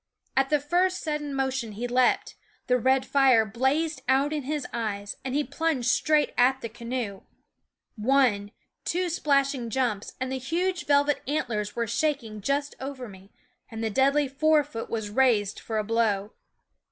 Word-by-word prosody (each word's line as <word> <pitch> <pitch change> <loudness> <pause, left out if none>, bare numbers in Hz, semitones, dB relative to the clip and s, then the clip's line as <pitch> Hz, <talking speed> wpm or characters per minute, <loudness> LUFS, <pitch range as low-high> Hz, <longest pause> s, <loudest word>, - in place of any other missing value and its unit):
At 270 0 +2
the 300 - +3
first 360 +6 +1
sud 300 -2 -1
den 290 -2 -5
motion 265 -4 -2
he 235 +4 -4
leaped; 250 +1 +2 0.3
the 250 0 +2
red 260 +2 +2
fire 260 -5 +4
blazed 265 +7 0
out 275 +3 +2
in 300 - -1
his 290 +1 -3
eyes, 205 -3 -3
and 260 0 -3
he 295 - +2
plunged 280 -2 -1
straight 295 +3 +2
at 260 +2 +4
the 230 - -5
canoe 235 -3 -5 0.7
one, 225 -3 +2 0.3
two 360 +1 -1
splashing 275 -6 +1
jumps, 225 -4 -1
and 260 0 -3
the 265 - -2
huge 350 +7 -2
velvet 285 0 +3
antlers 235 -8 -2
were 235 - 0
shaking 230 -3 -2
just 280 +5 -1
over 265 -2 -6
me 195 0 -14 0.4
and 225 -1 -6
the 220 - -1
deadly 275 +4 +3
fore 300 +3 +3
foot 230 -6 -7
was 220 -2 -3
raised 220 -5 +2
for 220 - -4
a 215 - +1
blow. 215 -1 0
265 Hz, 165 wpm, -26 LUFS, 225-290 Hz, 0.7 s, fire